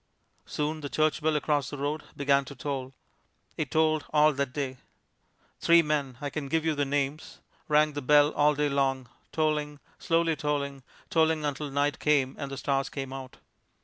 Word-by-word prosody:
Soon 155 Hz, +1 st, -2 dB
the 145 Hz, -, -5 dB
church 155 Hz, 0 st, +1 dB
bell 155 Hz, 0 st, +1 dB
across 145 Hz, -1 st, 0 dB
the 145 Hz, -, -6 dB
road 145 Hz, +2 st, -2 dB, 0.2 s
began 140 Hz, -1 st, +3 dB
to 140 Hz, -, -10 dB
toll. 135 Hz, -1 st, -4 dB, 0.6 s
It 150 Hz, -4 st, -3 dB
tolled 155 Hz, -1 st, +2 dB
all 150 Hz, 0 st, +4 dB
that 140 Hz, -1 st, -2 dB
day. 130 Hz, -2 st, -3 dB, 0.8 s
Three 170 Hz, 0 st, +5 dB
men 145 Hz, -5 st, -1 dB
I 145 Hz, -1 st, -4 dB
can 150 Hz, -3 st, -4 dB
give 160 Hz, +3 st, 0 dB
you 160 Hz, -, +2 dB
their 145 Hz, -1 st, -1 dB
names 145 Hz, +2 st, -2 dB, 0.3 s
rang 150 Hz, 0 st, +3 dB
the 145 Hz, -, -4 dB
bell 145 Hz, +2 st, +5 dB
all 150 Hz, 0 st, +3 dB
day 150 Hz, +1 st, +1 dB
long, 135 Hz, -3 st, 0 dB, 0.2 s
tolling, 150 Hz, -2 st, -1 dB, 0.2 s
slowly 165 Hz, -1 st, +1 dB
tolling, 140 Hz, -2 st, -2 dB, 0.3 s
tolling 160 Hz, -1 st, +2 dB
until 145 Hz, 0 st, -3 dB
night 145 Hz, +1 st, 0 dB
came 140 Hz, -3 st, +2 dB
and 140 Hz, -2 st, -4 dB
the 135 Hz, -, -6 dB
stars 135 Hz, 0 st, -1 dB
came 135 Hz, -2 st, -5 dB
out. 130 Hz, -1 st, -8 dB
145 Hz, 180 wpm, -28 LUFS, 140-155 Hz, 0.8 s, Three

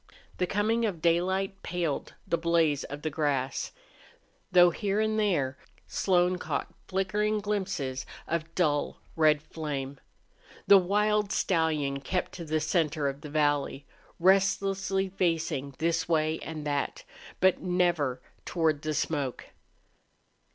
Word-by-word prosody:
The 180 Hz, -, +1 dB
coming 220 Hz, +4 st, +1 dB
of 200 Hz, -7 st, -1 dB
daylight 190 Hz, +4 st, +1 dB
paled 170 Hz, -5 st, -3 dB
the -, -, +2 dB
blaze 165 Hz, -4 st, +2 dB
of 145 Hz, +1 st, -8 dB
the 155 Hz, -, -1 dB
grass, 140 Hz, -3 st, -1 dB, 0.8 s
though 175 Hz, -1 st, +7 dB
here 200 Hz, +2 st, -1 dB
and 220 Hz, 0 st, +1 dB
there 145 Hz, -11 st, +1 dB, 0.3 s
Slone 180 Hz, -1 st, +2 dB
caught -, -, -3 dB
flickering 210 Hz, +3 st, 0 dB
glimpses 190 Hz, -11 st, -2 dB, 0.2 s
of 165 Hz, -1 st, -3 dB
dull 150 Hz, -5 st, +1 dB, 0.2 s
red 155 Hz, -2 st, +4 dB
flame. 140 Hz, -4 st, -5 dB, 0.7 s
The 200 Hz, -, +8 dB
wild 210 Hz, +2 st, +1 dB
stallion 155 Hz, -6 st, +1 dB
kept 180 Hz, +5 st, -2 dB
to 170 Hz, -, -7 dB
the 155 Hz, 0 st, 0 dB
center 155 Hz, -2 st, +1 dB
of 140 Hz, +1 st, -4 dB
the 150 Hz, -, -8 dB
valley, 145 Hz, -2 st, 0 dB, 0.3 s
restlessly 195 Hz, +1 st, +2 dB
facing 165 Hz, -7 st, -1 dB
this 170 Hz, +1 st, 0 dB
way 155 Hz, -1 st, +1 dB
and 155 Hz, -2 st, -6 dB
that, 145 Hz, -1 st, -2 dB, 0.4 s
but 190 Hz, -1 st, +3 dB
never 175 Hz, -8 st, +1 dB, 0.2 s
toward 160 Hz, -4 st, 0 dB
the 155 Hz, 0 st, -2 dB
smoke. 145 Hz, -6 st, -2 dB
165 Hz, 125 wpm, -29 LUFS, 150-190 Hz, 0.8 s, The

